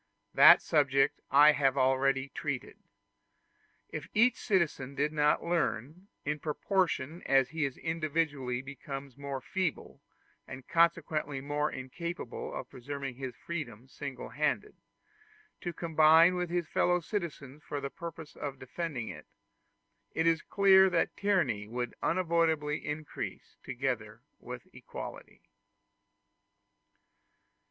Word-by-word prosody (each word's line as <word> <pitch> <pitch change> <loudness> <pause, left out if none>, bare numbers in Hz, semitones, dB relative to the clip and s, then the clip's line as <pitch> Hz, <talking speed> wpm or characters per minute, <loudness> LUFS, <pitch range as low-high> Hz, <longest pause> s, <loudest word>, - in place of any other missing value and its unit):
That - - +9
subject 140 -1 +2
I 145 +2 +8
have 140 -2 +1
already 135 +1 +2
treated. 140 -4 -5 1.1
If - - -6
each 235 +3 +5
citizen 155 - 0
did 150 +2 0
not 150 0 +2
learn, 170 - -2 0.2
in 150 +1 -1
proportion 165 -1 -1
as 135 -1 +4
he 155 0 0
individually 145 -4 -2
becomes 140 -1 -7
more 140 -1 -5
feeble, 185 -2 -3 0.5
and 130 0 -9
consequently 160 -4 +1
more 145 +2 -1
incapable 175 - -6
of - - -6
preserving 135 0 -6
his 130 -2 -5
freedom 130 -8 -6
single 135 -1 -7
handed, 150 - -1 0.9
to 175 - -4
combine 165 +1 +5
with 180 -1 -2
his 175 -2 -1
fellow 180 +1 +2
citizens 155 -7 -5
for 145 - -4
the 140 0 -5
purpose 165 -2 -8
of 140 -2 -5
defending 130 -2 -4
it, - - -9 0.9
it 160 - +1
is 165 -1 +3
clear 190 -1 +5
that 175 -2 0
tyranny 165 - +1
would 120 +2 -3
unavoidably 165 -4 +1
increase 150 0 -6
together 120 -3 -3 0.2
with - - -9
equality. - - -9
150 Hz, 115 wpm, -31 LUFS, 135-170 Hz, 1.1 s, That